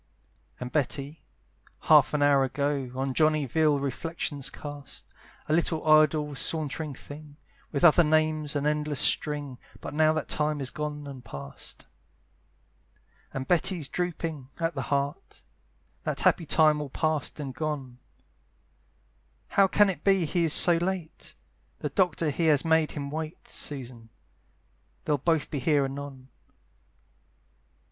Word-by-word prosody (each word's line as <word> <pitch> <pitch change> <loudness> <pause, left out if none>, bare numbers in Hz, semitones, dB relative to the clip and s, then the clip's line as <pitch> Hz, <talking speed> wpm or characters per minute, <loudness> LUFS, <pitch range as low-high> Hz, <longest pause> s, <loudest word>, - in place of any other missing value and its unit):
And 125 0 -6
Betty, 145 +1 -2 0.6
half - - +5
an 145 - +2
hour 140 -1 +5
ago, 140 0 -1
On 135 0 -2
Johnny 155 0 +2
vile 150 +3 +2
reflections 140 0 -2
cast; 145 0 -9 0.4
"A 150 - 0
little 160 -1 +1
idle 155 -1 +4
sauntering 150 0 -1
thing!" 145 +1 -12 0.3
With 140 - -1
other 175 0 +7
names, 155 -1 +1
an 145 0 -1
endless 150 -1 0
string, 145 -4 +2 0.2
But - - -7
now 155 +1 +4
that 155 -2 -3
time 150 0 -1
is 135 -2 -2
gone 150 -1 -5
and 135 -3 -9
past. 70 - -9 1.5
And 130 0 -5
Betty's 175 -3 +1
drooping 165 -6 -4
at 165 0 0
the 135 - -3
heart, 140 0 -3 0.6
That - - -2
happy 165 - +2
time 155 -1 +4
all 145 - -5
past 155 +1 -2
and 135 -3 -5
gone, 135 -3 -4 1.5
"How 195 -1 +4
can 205 +2 +4
it 175 -6 -3
be 195 -3 +3
he 170 +2 +1
is 155 - +2
so 175 -1 +5
late? 175 -2 -4 0.4
"The - - -3
doctor 170 -5 +1
he 165 +3 0
has 150 0 +3
made 160 -1 +2
him 140 -1 -5
wait, 160 +2 -6
"Susan! 125 -5 -6 1.0
they'll 150 -2 +1
both 160 0 0
be 145 - -2
here 145 +1 +2
anon." 135 -1 -7
150 Hz, 140 wpm, -27 LUFS, 140-160 Hz, 1.5 s, other